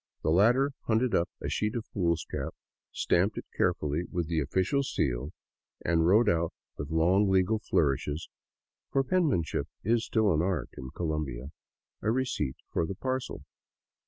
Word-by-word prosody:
The -, -, +2 dB
latter 120 Hz, -, +4 dB, 0.2 s
hunted 115 Hz, +2 st, +2 dB
up 85 Hz, -, +2 dB
a -, -, -2 dB
sheet 105 Hz, +2 st, -1 dB
of 115 Hz, -2 st, -3 dB
foolscap, 85 Hz, -4 st, -2 dB, 0.4 s
stamped 100 Hz, +5 st, +1 dB
it -, -, -5 dB
carefully 75 Hz, +4 st, +1 dB
with 85 Hz, -3 st, -2 dB
the 80 Hz, -1 st, 0 dB
office 100 Hz, -, 0 dB
seal, 65 Hz, +1 st, 0 dB, 0.6 s
and 85 Hz, -1 st, +3 dB
wrote 105 Hz, +6 st, +5 dB
out 85 Hz, -1 st, +2 dB, 0.2 s
with 70 Hz, -, -5 dB
long 90 Hz, +5 st, +3 dB
legal 95 Hz, +3 st, +3 dB
flourishes 75 Hz, -3 st, 0 dB, 0.3 s
— -, -, -64 dB
for 135 Hz, -, +3 dB
penmanship 135 Hz, -, +1 dB, 0.2 s
is 115 Hz, +2 st, +2 dB
still 110 Hz, -5 st, +2 dB
an 75 Hz, -, +2 dB
art 90 Hz, -7 st, -1 dB
in 65 Hz, -, -7 dB
Colombia 75 Hz, -5 st, -3 dB, 0.3 s
— -, -, -61 dB
a 110 Hz, -, 0 dB
receipt 115 Hz, -, 0 dB, 0.2 s
for 80 Hz, -, +1 dB
the 95 Hz, -, -4 dB
parcel. 130 Hz, +5 st, -3 dB
90 Hz, 160 wpm, -29 LUFS, 80-110 Hz, 0.6 s, wrote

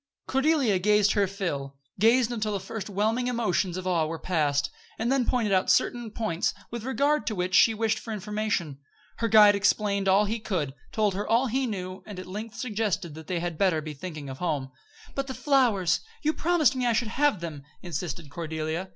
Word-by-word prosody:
Cordelia 270 Hz, -, +2 dB
gazed 210 Hz, +1 st, +4 dB
her 200 Hz, -2 st, +2 dB
fill 145 Hz, -9 st, -4 dB, 0.2 s
gazed 235 Hz, +3 st, +4 dB
until 215 Hz, -3 st, -2 dB
the 200 Hz, -, -1 dB
first 200 Hz, +3 st, -6 dB
whelming 220 Hz, +5 st, 0 dB
emotions 205 Hz, -7 st, 0 dB
of 185 Hz, -, -5 dB
awe 170 Hz, -4 st, +1 dB
were 165 Hz, +1 st, -4 dB
past, 145 Hz, -5 st, 0 dB, 0.3 s
and 230 Hz, +3 st, 0 dB
then 270 Hz, -3 st, +2 dB
pointed 225 Hz, -5 st, +1 dB
out 185 Hz, 0 st, +2 dB
certain 240 Hz, -2 st, +2 dB
points 215 Hz, -1 st, -1 dB, 0.2 s
with 235 Hz, -2 st, -5 dB
regard 285 Hz, +3 st, +1 dB
to 215 Hz, -, -1 dB
which 180 Hz, 0 st, -2 dB
she 225 Hz, +3 st, +6 dB
wished 220 Hz, 0 st, 0 dB
for 225 Hz, -, -8 dB
information. 210 Hz, -8 st, -2 dB, 0.4 s
Her 230 Hz, -, 0 dB
guide 215 Hz, -2 st, +7 dB
explained 200 Hz, 0 st, +1 dB
all 195 Hz, +2 st, +5 dB
he 225 Hz, +3 st, -2 dB
could 170 Hz, -11 st, -2 dB, 0.2 s
told 210 Hz, -3 st, +1 dB
her 200 Hz, +2 st, -3 dB
all 235 Hz, +3 st, +3 dB
he 260 Hz, +2 st, 0 dB
knew; 185 Hz, -3 st, -5 dB
and 205 Hz, -3 st, -8 dB
at 185 Hz, -, -6 dB
length 215 Hz, +4 st, -7 dB
suggested 205 Hz, -8 st, -2 dB
that 160 Hz, 0 st, -11 dB
they 180 Hz, -2 st, -1 dB
had 175 Hz, -2 st, -4 dB
better 185 Hz, -5 st, +3 dB
be 155 Hz, 0 st, -6 dB
thinking 155 Hz, -2 st, -7 dB
of 130 Hz, -1 st, -7 dB
home. 145 Hz, -7 st, -2 dB, 0.4 s
"But 275 Hz, 0 st, -2 dB
the 260 Hz, -, -5 dB
flowers! 245 Hz, -, +2 dB, 0.2 s
You 310 Hz, +1 st, +2 dB
promised 315 Hz, -7 st, +2 dB
me 250 Hz, -1 st, 0 dB
I 235 Hz, -, +3 dB
should 225 Hz, 0 st, 0 dB
have 280 Hz, -3 st, +2 dB
them," 160 Hz, -4 st, -6 dB, 0.2 s
insisted 165 Hz, -3 st, -5 dB
Cordelia. 160 Hz, +3 st, -3 dB
205 Hz, 200 wpm, -27 LUFS, 175-230 Hz, 0.4 s, guide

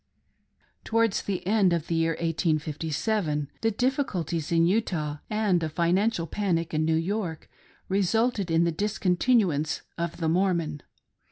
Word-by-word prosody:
Towards 230 Hz, -2 st, +1 dB
the 195 Hz, -3 st, -4 dB
end 195 Hz, -3 st, +3 dB
of 165 Hz, -2 st, -1 dB
the -, -, -3 dB
year 165 Hz, 0 st, +2 dB
1857, 155 Hz, 0 st, -1 dB
the 225 Hz, -, +2 dB
difficulties 205 Hz, -, -1 dB
in 165 Hz, 0 st, +4 dB
Utah, 170 Hz, -7 st, 0 dB
and 210 Hz, -5 st, +1 dB
a 160 Hz, -, -1 dB
financial 175 Hz, +4 st, +1 dB
panic 170 Hz, -2 st, -1 dB
in 155 Hz, 0 st, +1 dB
New 160 Hz, 0 st, +2 dB
York, 170 Hz, 0 st, -2 dB, 0.4 s
resulted 200 Hz, +1 st, +1 dB
in 165 Hz, +1 st, +3 dB
the 170 Hz, -1 st, +1 dB
discon 200 Hz, 0 st, 0 dB
tinuance 175 Hz, -, +2 dB, 0.2 s
of 170 Hz, -1 st, -3 dB
the 165 Hz, -, -1 dB
Mormon. 170 Hz, -4 st, 0 dB
170 Hz, 140 wpm, -27 LUFS, 160-205 Hz, 0.4 s, in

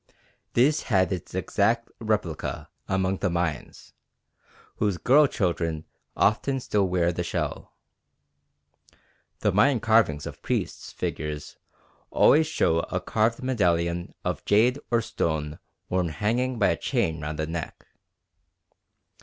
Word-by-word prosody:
This 140 Hz, +6 st, +3 dB
had 95 Hz, -4 st, +3 dB
its 90 Hz, 0 st, -6 dB
exact 115 Hz, +5 st, 0 dB
replica 105 Hz, -7 st, -2 dB, 0.2 s
among 95 Hz, 0 st, 0 dB
the -, -, 0 dB
Mayans, 85 Hz, -3 st, -3 dB, 0.8 s
whose 100 Hz, -4 st, 0 dB
girl 140 Hz, -, +5 dB
children 85 Hz, -, -1 dB, 0.3 s
often 135 Hz, +6 st, +2 dB
still 105 Hz, -5 st, 0 dB
wear 90 Hz, -1 st, +1 dB
the -, -, -3 dB
shell. -, -, -4 dB, 1.7 s
The -, -, +2 dB
Mayan 125 Hz, +6 st, +4 dB
carvings 110 Hz, -10 st, +2 dB
of -, -, -8 dB
priests' -, -, -3 dB
figures 75 Hz, -1 st, -5 dB, 0.5 s
always 155 Hz, +1 st, +5 dB
show 80 Hz, -, +2 dB
a -, -, -2 dB
carved 115 Hz, +3 st, 0 dB
medallion 85 Hz, -8 st, 0 dB
of -, -, -2 dB
jade 120 Hz, +6 st, +3 dB
or 115 Hz, -1 st, +2 dB
stone 75 Hz, -4 st, -2 dB, 0.3 s
worn 90 Hz, -2 st, 0 dB
hanging 115 Hz, -, -1 dB
by 105 Hz, -, +3 dB
a -, -, 0 dB
chain 80 Hz, -1 st, -1 dB
round 75 Hz, +1 st, -4 dB
the 80 Hz, -, -1 dB
neck. 80 Hz, 0 st, -6 dB
95 Hz, 120 wpm, -26 LUFS, 85-115 Hz, 1.7 s, girl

